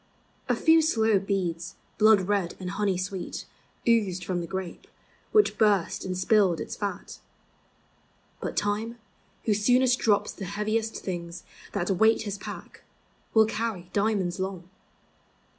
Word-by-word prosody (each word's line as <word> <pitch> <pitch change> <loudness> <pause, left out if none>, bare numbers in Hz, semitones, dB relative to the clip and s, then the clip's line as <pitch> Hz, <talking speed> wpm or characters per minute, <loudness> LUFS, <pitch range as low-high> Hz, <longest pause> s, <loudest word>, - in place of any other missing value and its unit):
A - - +3
few 325 0 +5
slow 225 -9 +3
beads, 180 -4 -2 0.2
blood 215 -2 +6
red 190 -2 -1
and 185 -1 -4
honey 195 -2 0
sweet, 185 0 -4 0.4
Oozed 195 -7 +2
from 180 -1 -1
the 170 - -5
grape, 190 -2 -6 0.4
which 425 -1 +3
burst 205 -5 +2
and 185 -1 -3
spilled 185 -3 +3
its - - -5
fat. 205 -1 -5 1.2
But - - -5
Time, 215 +3 -1 0.5
who 220 - +3
soonest 250 +4 +3
drops 210 -1 +2
the 195 - -7
heaviest 215 +3 -1
thin 175 -2 -5 0.4
That 195 -1 -1
weight 220 +4 +3
his 200 -2 -5
pack, - - -9 0.5
will 220 0 +7
carry 215 -5 -3
diamonds 200 -3 0
Long. 185 -2 -4
200 Hz, 135 wpm, -27 LUFS, 185-220 Hz, 1.2 s, will